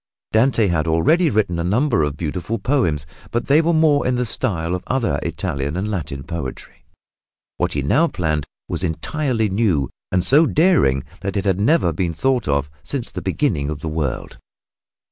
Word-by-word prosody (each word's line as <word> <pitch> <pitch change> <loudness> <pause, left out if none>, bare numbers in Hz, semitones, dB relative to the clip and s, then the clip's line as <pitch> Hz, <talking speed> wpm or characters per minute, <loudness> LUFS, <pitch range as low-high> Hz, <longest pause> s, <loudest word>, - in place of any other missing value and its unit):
Dante 115 0 +3
had 85 -4 0
already 115 - +3
written 100 -8 0
a - - 0
number 110 - +2
of 75 -1 -1
beautiful 90 +7 -3
poems, 95 - 0 0.2
but 120 - -2
they 145 +3 +5
were 165 +1 +1
more 155 -4 +3
in 125 - +1
the 125 0 0
style 85 -6 -1
of 90 - -3
other 130 -2 0
Italian 70 +4 -3
and 105 +3 -2
Latin 75 -8 -4
poetry. 80 -4 -7 0.7
What - - 0
he 70 - -1
now 150 - +3
planned 80 - -2 0.2
was - - -3
entirely 115 - -1
new 95 - +1 0.2
and 90 -1 +2
so 150 - +5
daring 150 - +3 0.2
that 100 0 -3
it 100 - -1
had 95 -1 +1
never 105 - +3
been 85 0 -2
thought 130 +5 +1
of 70 0 +1
since 115 - -5
the - - -5
beginning 75 - 0
of 75 -1 -5
the 80 - -3
world. 75 -5 -3
95 Hz, 180 wpm, -20 LUFS, 80-130 Hz, 0.7 s, they